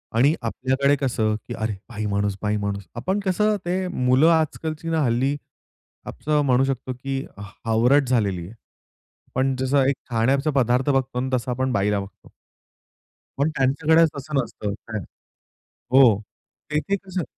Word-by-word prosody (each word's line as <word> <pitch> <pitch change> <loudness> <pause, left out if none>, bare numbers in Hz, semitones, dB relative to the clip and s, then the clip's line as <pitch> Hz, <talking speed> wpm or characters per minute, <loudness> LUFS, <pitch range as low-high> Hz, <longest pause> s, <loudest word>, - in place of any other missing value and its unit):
आणि 140 +6 +5
आपल्याकडे 130 +4 +1
कसं 110 -5 +1
की - - -5
"अरे 110 -1 -2 0.2
बाई 110 -2 -4
माणूस, 100 -1 0
बाई 105 0 0
माणूस." 100 -1 -3
आपण 190 - -1
कसं 210 +3 +2
ते 185 +1 -1
मुलं 130 -2 +3
आजकालची 160 0 -1
ना 160 -1 +1
हल्ली 130 +4 +1 0.7
असं 150 0 0
म्हणू 130 0 +4
शकतो 130 -1 -2
की 135 +2 -4 0.2
ह - - -8 0.2
हावरट 125 +5 +3
झालेली 100 -8 0
आहे. 100 - -12 0.8
पण 130 +1 +1
जसं 135 +1 +2
एक 140 - +2 0.2
खाण्याचा 135 +6 +2
पदार्थ 125 +3 +2
बघतो 135 -2 0
आणि 130 +1 -1
तसं 125 0 -1
आपण 130 +1 -1
बाईला 100 -2 +1
बघतो. 100 +1 -11 1.1
पण 140 +3 +2
त्यांच्याकडेच 155 +5 +3
तसं 145 +2 -6
नसतं. 105 -3 -5
काय? 110 -1 -3 0.9
हो. 125 -6 +6 0.5
तेथे 155 +7 0
कसं 185 -2 -3
130 Hz, 150 wpm, -23 LUFS, 115-145 Hz, 1.1 s, हो